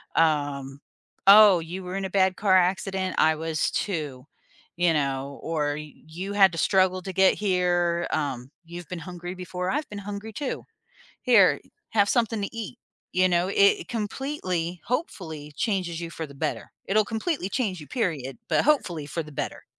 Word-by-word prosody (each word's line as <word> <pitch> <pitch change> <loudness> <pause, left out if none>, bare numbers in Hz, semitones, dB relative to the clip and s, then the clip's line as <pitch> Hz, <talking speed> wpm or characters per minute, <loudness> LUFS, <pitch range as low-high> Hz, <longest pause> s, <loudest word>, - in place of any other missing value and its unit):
um, 145 -3 0 0.5
"Oh, 200 -3 +9
you 175 +3 -6
were 180 +1 -5
in 195 - -2
a - - -3
bad 190 -1 +2
car 195 -2 +3
accident? 190 0 0
I 160 0 +4
was, 160 -1 -1
too," 150 -9 -3 0.5
you 175 -2 +3
know, 140 -1 -2
or 150 -3 -1
"You 160 +6 -8
had 195 -2 +6
to - - -5
struggle 185 -1 +3
to 190 - -5
get 190 0 +4
here," 175 -3 +1
um, 130 -4 -2 0.2
"You've 170 0 -9
been 180 -2 -5
hungry 175 +1 -7
before. 180 0 -4
I've 295 +1 -2
been 205 -1 -6
hungry 205 +2 -7
too. 280 +2 -4 0.6
Here, 225 -7 +5 0.3
have 205 -2 +3
something 225 -3 +1
to - - -3
eat," 230 +2 -6 0.3
you 185 0 +3
know, 175 +1 +2
it 200 0 +4
completely, 205 - -3
hopefully 160 - -4
changes 180 -6 -1
you 170 -1 -5
for 160 -1 -5
the 140 - -14
better. 150 +2 -3 0.2
It'll 215 +2 +3
completely 225 - -2
change 195 - -1
you, 150 - -10
period, 155 - -2
but - - +3
hopefully 175 - +1
for 165 +3 -3
the 150 - -12
better. - - -5
180 Hz, 170 wpm, -26 LUFS, 160-200 Hz, 0.6 s, Oh